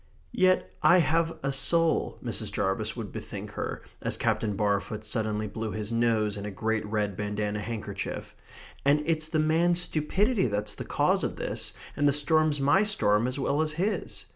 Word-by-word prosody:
"Yet 185 0 +2
I 165 +4 +6
have 165 0 +1
a 135 - 0
soul," 160 +5 +1
Mrs. - - 0
Jarvis 100 +2 -1
would 115 -4 -6
bethink - - -7
her, - - -5 0.2
as - - -1
Captain 105 -2 0
Barfoot 105 +1 -1
suddenly 110 -1 0
blew 110 +1 -4
his 110 0 -3
nose 115 -3 +1
in 100 - -5
a 105 - -4
great 110 +3 -1
red 105 -2 -1
bandanna 105 +1 -2
handkerchief, 110 +1 -5 0.5
"and 145 +2 +3
it's 155 -1 0
the 160 0 -1
man's 165 +3 +3
stupidity 185 - +1
that's 105 -1 -1
the - - -6
cause - - +1
of - - -2
this, - - -3 0.2
and 145 - +2
the 140 - +4
storm's 155 0 +3
my 145 +8 +4
storm 115 - +2
as 130 +2 -2
well 140 +2 0
as 155 -1 0
his"... 190 +7 -2
125 Hz, 175 wpm, -28 LUFS, 105-155 Hz, 0.5 s, I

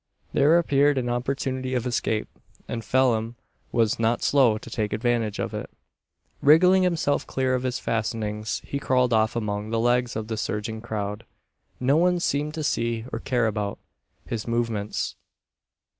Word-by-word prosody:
There 150 +4 +5
appeared 145 -3 +3
an 125 -2 -1
opportunity 130 +1 -2
of 125 -1 -1
escape, 110 -3 -1 0.4
and 115 -1 -4
Phelim 115 0 +1 0.4
was 115 -2 +1
not 115 +1 +1
slow 130 -6 +4
to - - -12
take 105 -2 -2
advantage 115 -1 0
of - - -3
it. - - -5 0.7
Wriggling 180 +6 +6
himself 170 -5 +1
clear 130 -1 0
of 125 - +1
his 130 -1 -1
fastenings, 110 -1 -2
he 140 - -3
crawled 125 -3 +2
off 110 +1 +2
among 105 -2 -2
the 115 0 0
legs 120 +1 +1
of 110 -1 -3
the 110 -1 -3
surging 105 +1 -3
crowd. 105 -2 -4 0.6
No 135 +4 +3
one 180 +1 +3
seemed 150 -1 -1
to 155 - -3
see, 115 -5 -1
or 115 - -2
care 120 -1 0
about, 105 -2 -2 0.5
his 115 -1 -4
movements. 115 -3 -2
120 Hz, 160 wpm, -25 LUFS, 110-130 Hz, 0.7 s, Wriggling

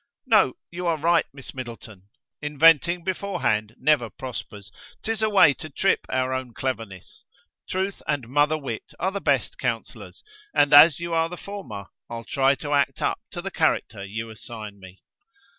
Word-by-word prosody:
"No, - - +4 0.2
you 175 +1 -4
are 165 -1 +2
right, 165 +2 +2
Miss 135 -1 -10
Middleton, 115 -6 -9 0.3
inventing 165 +3 +4
beforehand 175 - -1
never 135 -4 +2
prospers; 105 -3 -8 0.3
't 225 - -1
is 220 -1 -2
a 220 - +3
way 190 -8 +6
to 155 - -9
trip 195 +7 +1
our 130 0 0
own 130 -3 -4
cleverness. 115 -8 -5 0.5
Truth 190 +1 -2
and 135 -5 -1
mother 145 +4 +2
wit 135 -7 -6
are 190 +2 0
the 200 0 -4
best - - 0
counsellors: - - -4 0.3
and 145 0 +4
as 145 +1 +9
you 170 0 -4
are 165 0 +2
the 180 - -7
former, 130 - -7 0.2
I'll 115 0 -6
try 135 +1 +2
to 145 +1 -4
act 140 -1 +1
up - - 0
to - - -7
the - - -4
character 100 - 0
you 110 +3 -5
assign 110 -2 -9
me." 95 0 -14
140 Hz, 170 wpm, -24 LUFS, 115-170 Hz, 0.5 s, as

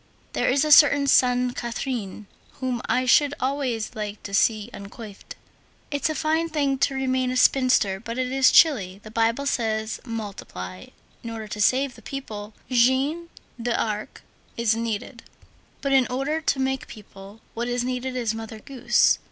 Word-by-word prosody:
There - - +1
is 280 +3 +2
a 305 - 0
certain 285 -1 +7
Sainte 250 -2 +3
Catherine 235 -4 -4 0.3
whom 255 -2 -3
I 255 - +1
should 290 +3 +4
always 255 -4 -2
like 210 -1 -6
to 200 - -8
see 215 +2 +2
uncoiffed.62 200 +1 -10 0.6
It's 285 +2 0
a 310 - -2
fine 320 +3 0
thing 280 -4 0
to 275 - +1
remain 260 -1 0
a 255 - -1
spinster, 250 -7 +3
but 230 +2 -6
it 255 0 -1
is 265 -1 +4
chilly. 200 - +4
The 215 - -11
Bible 230 +4 +1
says: 220 -4 -1
Multiply. 195 - -7 0.3
In 230 - -7
order 225 -1 -6
to 210 0 -4
save 260 +4 +2
the - - -15
people, 215 -6 -7 0.2
Jeanne 265 +7 +2 0.3
d'Arc 220 -3 -2 0.3
is 230 -2 +2
needed; 230 +1 -4 0.6
but 275 - -1
in 265 -2 +4
order 275 +5 -2
to 285 -3 0
make 265 0 -1
people, 200 -1 -13
what 235 +1 -3
is 245 0 -1
needed 255 +1 -3
is 235 -3 -1
Mother 225 0 -7
Goose. 250 +2 +2
245 Hz, 160 wpm, -24 LUFS, 220-270 Hz, 0.6 s, certain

